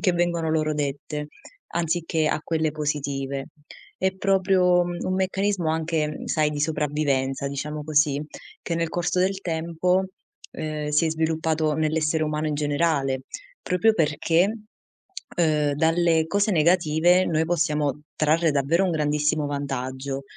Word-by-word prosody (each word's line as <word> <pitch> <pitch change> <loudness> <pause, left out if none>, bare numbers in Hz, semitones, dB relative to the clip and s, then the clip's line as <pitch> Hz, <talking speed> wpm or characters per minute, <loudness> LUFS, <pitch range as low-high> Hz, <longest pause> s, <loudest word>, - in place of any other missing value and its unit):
che 195 - +3
vengono 170 -2 0
loro 155 -1 +1
dette, 145 +1 -3 0.5
anziché 165 -1 0
a 155 - 0
quelle 160 -2 -1
positive. 140 -2 -3 0.5
È 190 0 0
proprio 190 -2 +3
un 175 +1 -3
meccanismo, 190 -2 0
anche, 160 -1 0
mhmm, 150 - -7
sai, 155 -1 +1
di 150 - -4
sopravvivenza, 145 -3 0
diciamo 150 +2 -4
così, 150 -2 +2 0.4
che 170 - -2
nel 165 0 0
corso 175 +2 -1
del 195 +1 0
tempo, 170 +3 0 0.4
ehm, 155 -1 -4
si 150 +2 +2
è - - 0
sviluppato 160 -1 0
nell'essere 155 0 0
umano 150 0 -1
in 150 - -1
generale, 145 -2 0 0.4
proprio 180 +5 +2
perché, 165 0 +2 0.9
uhm, 150 -4 +2
dalle 160 +1 +2
cose 200 +5 +1
negative 170 +2 +3
noi 160 0 +1
possiamo 150 -4 0 0.2
trarre 160 +2 +2
davvero 150 +6 +2
un 185 - +1
grandissimo 150 0 +1
vantaggio, 135 -1 -4
155 Hz, 135 wpm, -24 LUFS, 150-170 Hz, 0.9 s, che